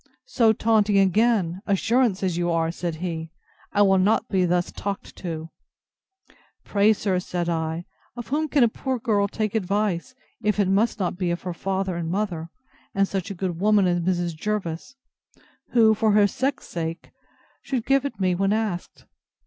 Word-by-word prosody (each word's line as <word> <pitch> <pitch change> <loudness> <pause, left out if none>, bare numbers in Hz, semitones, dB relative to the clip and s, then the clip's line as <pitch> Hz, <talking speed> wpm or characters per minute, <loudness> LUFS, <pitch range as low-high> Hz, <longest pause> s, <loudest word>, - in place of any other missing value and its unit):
So, 230 -3 +3
taunting 215 -2 +2
again! 195 -2 +2
Assurance 220 0 +2
as 185 -3 0
you 175 0 0
are! 165 -1 +1
said 170 -1 -4
he: 165 -1 -4 0.4
I 205 - +4
will 195 -1 +4
not 215 +4 +2
be 185 -2 +2
thus 175 0 0
talked 200 -1 -5
to! 165 -2 -6 1.1
Pray, 205 +1 +3
sir, 195 -3 0
said 175 -1 -3
I, 165 0 -2 0.3
of 240 -1 -7
whom 310 +3 0
can 285 -3 +3
a - - +6
poor 260 +3 -3
girl 215 -4 +1
take 215 0 -2
advice, 205 +2 -1 0.3
if 210 0 0
it 200 - +3
must 205 +4 +2
not 180 -1 -2
be 180 -2 0
of 170 0 -3
her 180 -1 -3
father 190 +1 -2
and 165 -1 -3
mother, 175 -4 -2 0.5
and 195 0 +3
such 195 +1 -3
a 200 - -5
good 175 -2 -3
woman 210 0 +4
as 175 -1 +2
Mrs. 175 -1 -1
Jervis, 205 - -3 0.8
who, 225 -2 +6
for 215 -1 +2
her 210 0 +6
sex 265 +7 -2
sake, 165 0 -5 0.5
should 250 -4 -3
give 275 0 +3
it 270 -7 -5
me 185 -1 +2
when 195 +2 +1
asked? 215 -5 -3
195 Hz, 175 wpm, -24 LUFS, 175-220 Hz, 1.1 s, a